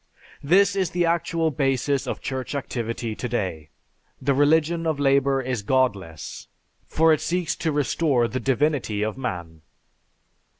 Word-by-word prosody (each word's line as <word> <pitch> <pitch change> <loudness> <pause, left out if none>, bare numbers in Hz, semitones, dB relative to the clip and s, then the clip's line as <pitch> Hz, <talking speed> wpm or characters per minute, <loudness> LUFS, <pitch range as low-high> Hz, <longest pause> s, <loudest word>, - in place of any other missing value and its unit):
This 195 +6 +4
is 190 -4 0
the 175 0 0
actual 165 -1 0
basis 135 -1 0
of - - -4
Church 130 +1 -4
activity 115 -4 -3
to 125 +3 -5
day. 90 -10 -3 0.5
The 140 +2 +1
religion 160 +4 +2
of 155 -3 -1
labor 135 -1 +2
is 125 -3 -2
godless, 100 -9 -1 0.4
for 160 0 +4
it 155 - 0
seeks 175 -1 -1
to 160 - -1
restore 145 -3 +1
the 130 - -3
divinity 135 -6 0
of 110 0 -2
man." 85 -11 -5
135 Hz, 140 wpm, -24 LUFS, 120-160 Hz, 0.5 s, This